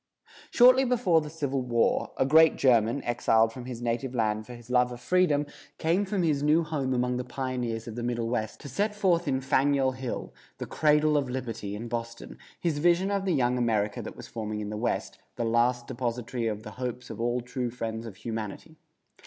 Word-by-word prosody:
Shortly 255 Hz, +2 st, +6 dB
before 230 Hz, -10 st, +3 dB
the 150 Hz, -, -7 dB
Civil 140 Hz, -4 st, -2 dB
War, 120 Hz, -2 st, +1 dB
a -, -, +2 dB
great 160 Hz, +3 st, +6 dB
German, 120 Hz, 0 st, +3 dB
exiled 115 Hz, -1 st, +2 dB
from 125 Hz, 0 st, -8 dB
his 120 Hz, -2 st, -6 dB
native 120 Hz, +2 st, -2 dB
land 110 Hz, -2 st, 0 dB
for 125 Hz, -, -8 dB
his 120 Hz, +1 st, -12 dB
love 125 Hz, 0 st, +3 dB
of 120 Hz, -, -7 dB
freedom, 150 Hz, +1 st, +2 dB, 0.3 s
came 175 Hz, +5 st, +1 dB
from 190 Hz, -2 st, -1 dB
his 150 Hz, -4 st, +1 dB
new 155 Hz, +3 st, +3 dB
home 140 Hz, -5 st, -1 dB
among 125 Hz, 0 st, 0 dB
the 125 Hz, -, -2 dB
pioneers 125 Hz, -3 st, -3 dB
of 115 Hz, -, -5 dB
the 120 Hz, -, -4 dB
Middle 120 Hz, -1 st, -1 dB
West 110 Hz, -2 st, -2 dB
to -, -, -8 dB
set 205 Hz, -, -1 dB
forth 180 Hz, -5 st, +2 dB
in 130 Hz, -1 st, 0 dB
Faneuil 135 Hz, 0 st, +2 dB
Hall, 130 Hz, -1 st, -5 dB, 0.2 s
the -, -, -5 dB
"cradle 150 Hz, 0 st, +3 dB
of 140 Hz, -3 st, -1 dB
liberty," 115 Hz, -5 st, -4 dB
in 115 Hz, +3 st, -6 dB
Boston, 115 Hz, 0 st, -6 dB, 0.2 s
his 160 Hz, -4 st, -1 dB
vision 175 Hz, +4 st, +3 dB
of 200 Hz, -1 st, -1 dB
the 185 Hz, -4 st, +1 dB
young 125 Hz, -2 st, +1 dB
America 110 Hz, -3 st, 0 dB
that -, -, -8 dB
was -, -, -9 dB
forming 110 Hz, -2 st, -4 dB
in 105 Hz, 0 st, -4 dB
the -, -, -4 dB
West, 115 Hz, +3 st, -2 dB, 0.2 s
"the 120 Hz, -, -2 dB
last 120 Hz, +1 st, +2 dB
depository 120 Hz, 0 st, -3 dB
of 105 Hz, -1 st, -3 dB
the 105 Hz, -, -8 dB
hopes 125 Hz, 0 st, -4 dB
of -, -, -6 dB
all 120 Hz, +1 st, 0 dB
true 125 Hz, 0 st, -3 dB
friends 115 Hz, -1 st, -5 dB
of 105 Hz, -, -9 dB
humanity." 115 Hz, -, -6 dB
125 Hz, 205 wpm, -28 LUFS, 115-150 Hz, 0.3 s, Shortly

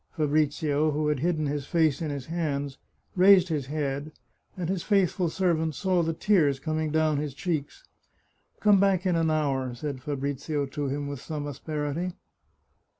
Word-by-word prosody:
Fabrizio, 150 Hz, -1 st, +1 dB
who 150 Hz, 0 st, 0 dB
had 150 Hz, -3 st, 0 dB
hidden 160 Hz, 0 st, 0 dB
his 145 Hz, -1 st, -3 dB
face 160 Hz, -4 st, +2 dB
in 160 Hz, -, -2 dB
his 140 Hz, -3 st, -4 dB
hands, 145 Hz, -4 st, -3 dB, 0.4 s
raised 185 Hz, -1 st, +6 dB
his 145 Hz, -5 st, -2 dB
head, 145 Hz, 0 st, -3 dB, 0.5 s
and 175 Hz, -3 st, -2 dB
his 185 Hz, 0 st, -1 dB
faithful 190 Hz, -3 st, +2 dB
servant 160 Hz, -4 st, 0 dB
saw 185 Hz, -3 st, +1 dB
the 165 Hz, 0 st, 0 dB
tears 160 Hz, -6 st, +2 dB
coursing 155 Hz, +2 st, -1 dB
down 155 Hz, -1 st, +2 dB
his 145 Hz, -2 st, -3 dB
cheeks. 165 Hz, -, -3 dB, 0.4 s
" -, -, -41 dB
Come 205 Hz, -2 st, +5 dB
back 195 Hz, -1 st, +2 dB
in 180 Hz, -2 st, +2 dB
an 165 Hz, -1 st, +2 dB
hour," 135 Hz, -5 st, 0 dB
said 135 Hz, +1 st, -5 dB
Fabrizio 145 Hz, +1 st, -2 dB
to 145 Hz, +1 st, -4 dB
him 140 Hz, +1 st, -3 dB
with 140 Hz, -2 st, -6 dB
some 150 Hz, -2 st, -5 dB
asperity. 150 Hz, +4 st, -3 dB
155 Hz, 165 wpm, -27 LUFS, 145-170 Hz, 0.5 s, raised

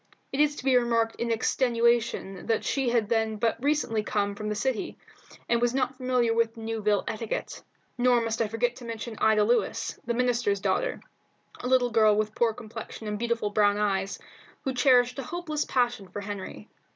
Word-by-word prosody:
It 270 Hz, -, -3 dB
is 295 Hz, 0 st, +3 dB
to 255 Hz, -, -9 dB
be 265 Hz, -1 st, +4 dB
remarked 230 Hz, -2 st, +2 dB
in 235 Hz, -, -2 dB
extenuation 230 Hz, -4 st, +1 dB
that 225 Hz, -1 st, +1 dB
she 270 Hz, -3 st, 0 dB
had 235 Hz, -3 st, +1 dB
then 220 Hz, -1 st, +1 dB
but 230 Hz, +3 st, -1 dB
recently 285 Hz, -7 st, +1 dB
come 205 Hz, -1 st, -1 dB
from 210 Hz, +1 st, -5 dB
the 210 Hz, -, -1 dB
city, 240 Hz, +1 st, -2 dB, 0.5 s
and 235 Hz, 0 st, +2 dB
was 240 Hz, +1 st, +1 dB
not 260 Hz, 0 st, 0 dB
familiar 250 Hz, -3 st, +1 dB
with 230 Hz, 0 st, 0 dB
Newville 220 Hz, -2 st, 0 dB
etiquette. 225 Hz, 0 st, -4 dB, 0.4 s
Nor 245 Hz, 0 st, +4 dB
must 230 Hz, -1 st, -2 dB
I 225 Hz, -, +2 dB
forget 240 Hz, +3 st, -1 dB
to 250 Hz, -, -11 dB
mention 230 Hz, 0 st, -6 dB
Ida 220 Hz, -1 st, +4 dB
Lewis, 235 Hz, +3 st, 0 dB
the 235 Hz, -, -2 dB
minister's 240 Hz, -5 st, +1 dB
daughter, -, -, -1 dB, 0.6 s
a -, -, -4 dB
little 250 Hz, -1 st, +3 dB
girl 215 Hz, -2 st, +5 dB
with 215 Hz, 0 st, 0 dB
poor 235 Hz, 0 st, +2 dB
complexion 220 Hz, 0 st, -8 dB
and 210 Hz, 0 st, -3 dB
beautiful 235 Hz, -3 st, -1 dB
brown 205 Hz, -1 st, +3 dB
eyes, 195 Hz, -2 st, 0 dB, 0.5 s
who 265 Hz, -, -1 dB
cherished 250 Hz, 0 st, +4 dB
a -, -, -3 dB
hopeless 310 Hz, +1 st, -3 dB
passion 245 Hz, -5 st, 0 dB
for 205 Hz, +3 st, -6 dB
Henry. 205 Hz, +1 st, -7 dB
230 Hz, 185 wpm, -27 LUFS, 215-245 Hz, 0.6 s, girl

